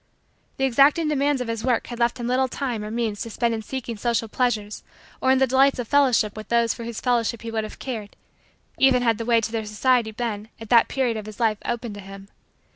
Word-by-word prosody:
The 270 - -2
exacting 280 +5 +4
demands 285 -2 +1
of 250 - -3
his 230 -1 -3
work 250 -2 +1
had 240 -1 -8
left 240 +2 +1
him 240 - -4
little 255 +2 +2
time 245 -4 -3
or 210 - -5
means 225 -2 -2
to 230 - -4
spend 230 +1 0
in 220 - -3
seeking 235 0 -5
social 230 0 0
pleasures 215 -3 -1 0.4
or 260 - +2
in 265 - +5
the 265 - +4
delights 270 +2 +3
of 245 -3 -4
fellowship 255 -7 +3
with 215 0 -8
those 235 -1 +2
for 235 - -8
whose 235 -1 -5
fellowship 235 -2 0
he 230 - -5
would 220 -1 -1
have 215 - -8
cared, 220 -6 -6 0.6
even 260 -2 +4
had 230 -2 +2
the 230 - -3
way 235 -1 +4
to 225 0 -3
their 225 -1 -2
society 225 +2 +1
been, 220 -1 -4
at 225 -1 -10
that 235 -1 +6
period 250 -4 0
of 215 -1 -7
his 215 +1 -10
life, 220 -3 +1
open 240 -2 -3
to 205 - -9
him. 195 0 -11
235 Hz, 240 wpm, -23 LUFS, 220-255 Hz, 0.6 s, that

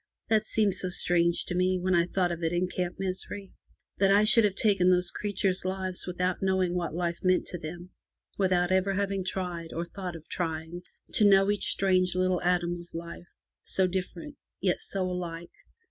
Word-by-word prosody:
That 220 -1 +2
seemed 210 -3 +2
so 185 - -2
strange 170 -1 +1
to - - -4
me, 185 +1 +2
when 185 +1 0
I 170 0 +3
thought 180 -1 0
of 170 0 -4
it 165 -1 0
in 175 +1 0
Camp 180 -1 -3
Misery 195 +1 -4 0.2
— - - -55
that 195 0 +4
I 200 +2 +5
should 230 +1 +6
have 200 -2 0
taken 195 -5 +3
those 180 -1 +2
creatures* 195 -2 -1
lives 185 -1 -3
without 180 0 -1
knowing 190 -2 +1
what 170 -3 -2
life 170 -1 -2
meant 185 -1 +3
to 175 - -5
them, 175 +4 -8 0.4
without 185 -2 +1
ever 190 +1 +2
having 195 -1 -1
tried, 180 -3 -4
or 170 +1 -3
thought 180 0 -6
of 160 -1 -11
trying, 165 0 -4 0.3
to 210 -2 +5
know 195 0 +5
each 205 - 0
strange 185 -2 +2
little 185 -1 +1
atom 175 -1 0
of 175 - -16
life, 170 +1 -7 0.4
so 190 - +1
different, 190 - -4 0.2
yet 180 -2 0
so 195 -1 -3
alike. 175 -2 -5
185 Hz, 190 wpm, -28 LUFS, 175-190 Hz, 0.4 s, should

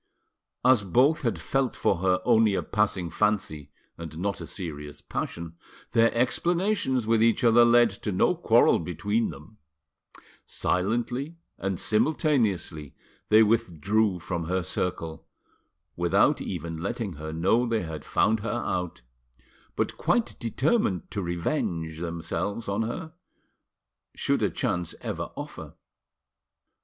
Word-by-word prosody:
As 130 -5 +5
both 130 - +3
had 120 -5 0
felt 135 -2 -1
for 95 - +1
her 90 0 +2
only 110 -4 +4
a - - -1
passing 100 -5 0
fancy 95 -8 -1 0.3
and 80 -1 -7
not 100 +3 -2
a - - -7
serious 75 -5 -7
passion, 85 0 -5 0.3
their 115 0 +4
explanations 135 - +1
with 115 0 +2
each 115 +1 +3
other 120 0 +6
led 120 -1 +5
to 105 - -2
no 90 - +3
quarrel - - +4
between 105 +7 -1
them; 75 +9 -12 0.8
silently 120 - -1 0.2
and 95 -2 -2
simultaneously 110 - 0 0.3
they 110 +1 +7
withdrew 105 -1 +1
from 85 -1 -4
her 90 +2 -1
circle, 85 -2 -3 0.7
without 95 - +3
even 85 -2 -4
letting 110 +3 -3
her 80 +1 -7
know 95 +10 +2
they 115 -3 0
had 80 -2 -6
found 110 0 +2
her 110 +2 -4 0.2
out, 90 -8 -3 0.7
but - - -1
quite 240 -1 +1
determined 120 - 0
to 100 - -2
revenge, 85 - -2
themselves 85 +6 -3
on 100 +2 -1
her 160 +9 -4 1.0
should - - 0
a - - +2
chance 90 -2 -2
ever - - -4
offer. - - -8
100 Hz, 125 wpm, -27 LUFS, 85-115 Hz, 1.0 s, they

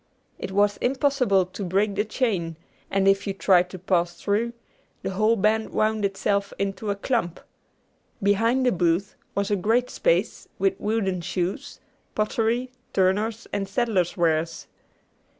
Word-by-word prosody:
It - - -5
was 205 +1 +2
impossible 255 -7 +2
to 185 +3 -7
break 195 +3 +1
the 205 +1 +1
chain; 200 -8 -1 0.3
and 195 0 +1
if 195 +1 +3
you 195 - -2
tried 180 -2 +4
to 185 - -8
pass 175 -1 0
through, 220 +4 0 0.5
the - - -2
whole 215 +4 +3
band 220 +1 +1
wound 215 0 0
itself 200 0 0
into 200 +2 -2
a 200 - +1
clump. 200 -5 -1 0.8
Behind 225 +6 +3
the 250 - +4
booth 175 +2 +1 0.2
was 200 +1 0
a - - +4
great 225 +6 +1
space - - 0
with 195 -1 +2
wooden 205 -4 -1
shoes, 190 - -3 0.4
pottery, 230 +3 0 0.2
turners' 205 +4 +1
and 195 -1 -2
saddlers' 195 -6 0
wares. 165 -1 0
200 Hz, 145 wpm, -25 LUFS, 185-220 Hz, 0.8 s, tried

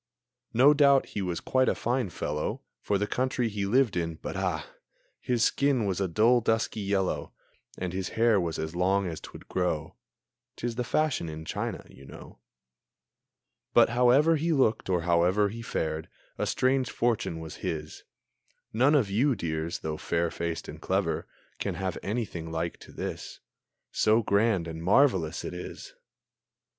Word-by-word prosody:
No 130 +6 +6
doubt 140 -2 +5
he 100 - -3
was 90 -3 -2
quite 130 0 +2
a - - +1
fine 120 -3 -1
fellow 75 -2 -3 0.2
For 100 - +1
the 105 - 0
country 125 +1 0
he 100 -2 -2
lived 120 0 +3
in 85 -2 -1
but, - - -6
ah! - - -2 0.5
His 120 -2 0
skin 140 -5 +2
was 95 -1 -1
a 95 - +1
dull, 115 +8 +4
dusky 110 0 0
yellow, 100 -2 -1 0.4
And 90 -1 -3
his 95 0 -3
hair 115 -3 +4
was 85 -2 -2
as 80 +2 -4
long 95 +2 +2
as 85 -3 -5
'twould - - -11
grow. 80 -4 -2 0.6
('Tis 120 0 -3
the 125 +2 -2
fashion 145 - 0
in 80 0 -7
China, - - -4
you 70 - -15
know.) - - -12 1.4
But - - +7
however 125 +7 +4
he 165 +3 0
looked, 130 -10 +2
or 90 -2 +2
however 90 +4 +3
He 115 +3 -7
fared, 80 -7 -3 0.3
a - - -2
strange 130 0 +1
fortune 115 -8 -1
was 80 -1 -8
his. 75 -1 -5 0.7
None 130 +7 +4
of 130 -8 +3
you, 130 +6 +2
dears, 80 -3 -3
though 80 -1 -3
fair 85 +1 -1
faced 85 -1 -4
and - - -9
clever, - - -1 0.3
Can - - -2
have 95 -2 -3
anything 95 -7 -3
like 80 +1 -2
to - - -13
this, - - -6 0.5
So 110 +2 +3
grand 100 -4 +2
and 80 0 -6
so - - -8
marvelous 95 - +3
it - - -5
is! 90 - -8
100 Hz, 165 wpm, -28 LUFS, 85-120 Hz, 1.4 s, But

